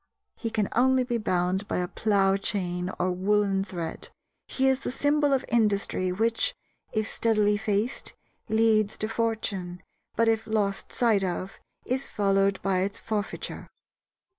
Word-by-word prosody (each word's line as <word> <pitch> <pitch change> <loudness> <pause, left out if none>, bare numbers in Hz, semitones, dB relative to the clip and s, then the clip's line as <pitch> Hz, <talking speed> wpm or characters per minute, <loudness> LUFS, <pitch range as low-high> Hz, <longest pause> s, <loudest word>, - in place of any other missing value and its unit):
He 230 - -4
can 215 -3 0
only 260 +2 +3
be 240 -2 -1
bound 185 -1 0
by - - -1
a 180 0 -1
plough 195 -1 +2
chain 180 -3 -2
or 180 +1 +1
woolen 195 +1 +1
thread. 175 -4 -5 0.4
He 265 0 +1
is 265 -1 +3
the - - -4
symbol 290 +2 +2
of 270 -2 +1
industry 200 -5 +1
which, 225 +4 0 0.4
if 215 0 -1
steadily 210 -3 +2
faced, 210 +3 -2 0.4
leads 220 -1 +3
to 215 - -1
fortune, 215 -6 -2 0.3
but, 230 - +3
if 225 0 +1
lost 205 -3 -1
sight 225 -6 +2
of, 185 +1 -3 0.3
is 260 +2 -1
followed 195 -1 +2
by 190 -2 +1
its 200 +3 -1
forfeiture. 215 -2 -4
210 Hz, 145 wpm, -27 LUFS, 195-225 Hz, 0.4 s, only